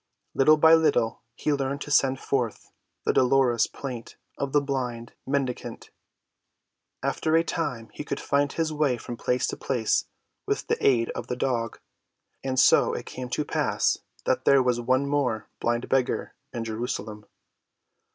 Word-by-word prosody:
Little 155 +3 +5
by 160 +1 +7
little 145 -8 +3
he 150 - 0
learned 140 0 -2
to 145 - -6
send 135 -2 +3
forth 125 -5 -2 0.3
the - - +2
dolorous 130 -2 +3
plaint 125 -4 -7 0.2
of 140 -1 -3
the 145 - +4
blind 125 -4 -3
mendicant. 135 -2 -3 1.1
After 160 0 +1
a 165 - +5
time 130 -10 -3
he - - -6
could - - -4
find 140 0 +1
his 160 -1 -1
way 145 -5 +1
from 120 - -7
place 125 +2 0
to - - -3
place 120 -5 0 0.4
with - - -1
the - - -1
aid 120 -4 +3
of - - -6
the 125 - -2
dog. 120 -3 -1 0.6
And 130 -1 0
so - - +5
it - - -5
came 125 -1 -7
to 150 +4 -1
pass - - +1 0.3
that - - +1
there 140 -2 +6
was 125 -1 +1
one 130 +3 +2
more 130 -7 -1
blind 120 +1 -1
beggar 130 -2 0 0.2
in 120 - -4
Jerusalem. 110 -2 -4
130 Hz, 160 wpm, -26 LUFS, 120-140 Hz, 1.1 s, by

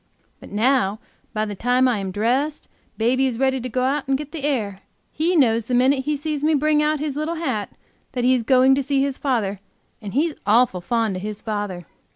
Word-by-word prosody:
But - - -12
now 215 -1 +1 0.3
by 215 0 -1
the 210 - -5
time 250 +5 +2
I 240 -4 +1
am 195 -1 -3
dressed, 250 +10 -1 0.3
baby 255 +4 +2
is 245 -3 -3
ready 265 0 +1
to 255 - -4
go 255 +2 -1
out 275 +2 0
to 270 - +2
get 295 +1 -5
the 320 -4 -6
air; 210 -9 -1 0.3
he 335 +4 0
knows 230 -7 +3
the 250 - 0
minute 265 +2 +3
he 300 - 0
sees 295 0 -3
me 310 0 +3
bring 300 +1 +2
out 305 0 +1
his 295 -2 -3
little 305 +3 -2
hat 260 -11 -2 0.4
that 250 -2 -2
he 255 +1 +4
is 255 - +2
going 260 +3 +4
to 275 - +2
see 275 0 0
his 275 -1 -2
father 215 -8 -1 0.4
and 205 0 -7
he's 310 +3 +2
awful 210 -3 +3
fond 225 -1 0
of - - -6
his 210 +1 -6
father. 205 -5 -4
255 Hz, 220 wpm, -22 LUFS, 215-285 Hz, 0.4 s, he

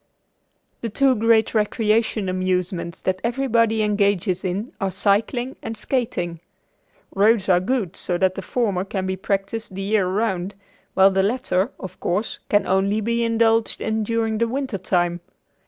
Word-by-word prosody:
The 230 - -3
two 270 +5 +3
great 225 0 +3
recreation 215 -1 +1
amusements 185 -1 -2
that 185 0 -1
everybody 230 -3 +1
engages 200 -3 +1
in 195 +6 -3
are 195 - +1
cycling 215 +7 0
and 225 - -5
skating. 180 - -2 0.7
Roads 205 0 +3
are 180 -2 +5
good 195 -2 -1
so 175 - -2
that 185 0 +2
the 195 - -5
former 200 -4 -1
can 190 -1 -3
be 190 0 -1
practiced 200 +2 -3
the 195 - -4
year 200 -1 +1
around, 190 -1 -1 0.4
while 195 +1 +6
the 190 0 +2
latter, 205 -2 0
of 190 - -8
course, 200 +6 -2
can 205 -1 +3
only 195 +3 +1
be 235 +2 0
indulged 225 -1 +2
in 220 0 -1
during 225 0 -1
the 235 - +2
winter 260 -4 -3
time. 175 -2 0
205 Hz, 155 wpm, -22 LUFS, 190-230 Hz, 0.7 s, while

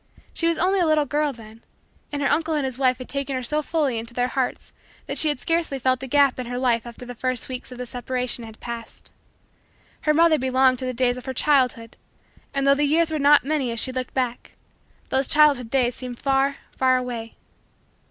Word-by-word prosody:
She 335 - 0
was 335 - +1
only 380 +3 +2
a 350 - +3
little 310 -1 +3
girl, 295 +1 0
then, 225 -2 -14 0.5
and 290 -1 -2
her - - +3
uncle 320 0 +1
and 290 -2 0
his 260 -1 -4
wife 255 -2 +3
had 255 - -8
taken 275 -1 -3
her 255 - -3
so 300 +5 0
fully 290 -6 0
into 230 +1 -9
their 245 0 +1
hearts 260 -1 -3 0.3
that - - -2
she 315 - +2
had 295 - +1
scarcely 330 0 -1
felt 255 0 +1
the 265 - -6
gap 280 -1 +3
in 250 - -4
her 245 +1 -4
life 240 -2 +1
after 240 +1 -10
the 245 - -7
first 255 0 -3
weeks 255 0 -7
of 250 - -8
the 250 - -5
separation 250 0 -3
had 220 -1 -11
passed. 235 -1 -7 0.9
Her 305 - +2
mother 330 -1 +5
belonged 260 0 +3
to 260 - -3
the 255 - -1
days 245 0 +1
of 250 - -9
her 260 - -3
childhood 250 -5 +1 0.5
and, 275 0 -1
though 275 - +6
the 290 +1 +1
years 320 +3 +2
were 310 - -1
not 290 +1 +6
many 285 -4 0
as 230 - -2
she 260 - -1
looked 255 -1 -5
back, 250 -2 -2 0.6
those 265 0 +1
childhood 290 -6 +4
days 250 -1 +2
seemed 250 -1 -7
far, 275 +1 +1 0.2
far, 260 -1 +4
away. 240 -3 -5
260 Hz, 220 wpm, -23 LUFS, 245-290 Hz, 0.9 s, though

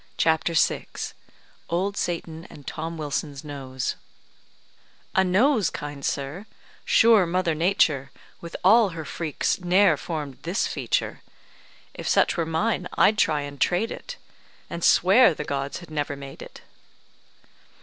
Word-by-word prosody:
CHAPTER 160 +1 +2
VI - - +2 0.8
OLD 190 +4 -1
SATAN 165 -3 -4
AND 145 - -14
TOM 165 +1 -5
WILSON'S 145 -1 -4
NOSE 135 -3 -4 1.2
"A 190 - +4
nose, 205 - +3
kind 145 -2 -7
sir! 145 +12 -3 0.4
Sure 225 -6 +5
mother 175 -1 0
Nature, 155 -5 +2 0.3
With 170 0 -8
all 215 +3 +6
her 160 - -5
freaks, 155 +4 -2
ne'er 180 -2 +4
formed 150 -5 -5
this 175 +6 -1
feature. - - -2 0.7
If - - -7
such - - +3
were 165 -2 -1
mine, 180 +3 0
I'd 215 0 +4
try 150 -2 +2
and 145 -1 -8
trade 180 +6 +1
it, - - -8 0.5
And 170 - -5
swear 190 0 +5
the 150 - -4
gods 140 -1 -3
had 170 -2 -13
never 145 -2 -2
made 140 -1 -10
it." - - -11
165 Hz, 135 wpm, -25 LUFS, 145-185 Hz, 1.2 s, all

